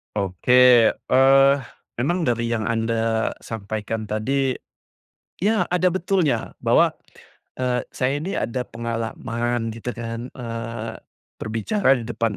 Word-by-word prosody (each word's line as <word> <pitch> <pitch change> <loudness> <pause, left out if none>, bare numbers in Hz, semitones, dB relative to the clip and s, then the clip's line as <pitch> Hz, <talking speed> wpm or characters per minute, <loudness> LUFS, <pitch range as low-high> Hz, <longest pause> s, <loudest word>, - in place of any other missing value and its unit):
Oke, 120 +5 +5
eee, 135 +1 +5 0.4
memang 175 +7 0
dari 115 -3 0
yang 115 -1 -1
Anda 115 0 0
sampaikan 110 0 -4
tadi, 130 +5 0 0.8
ya 215 +4 +1
ada 180 0 +2
betulnya 185 -5 0
bahwa, - - +3 0.6
eee, 125 -1 0
saya 135 +3 -1
ini 190 +4 -3
ada 125 +1 -2
pengalaman 115 0 -3
gitu 115 +2 -5
kan, 115 +1 -6
eee, 115 -2 -6 0.5
berbicara 130 - +1
di 115 - -6
depan 115 -2 -1
120 Hz, 110 wpm, -23 LUFS, 115-135 Hz, 0.8 s, Oke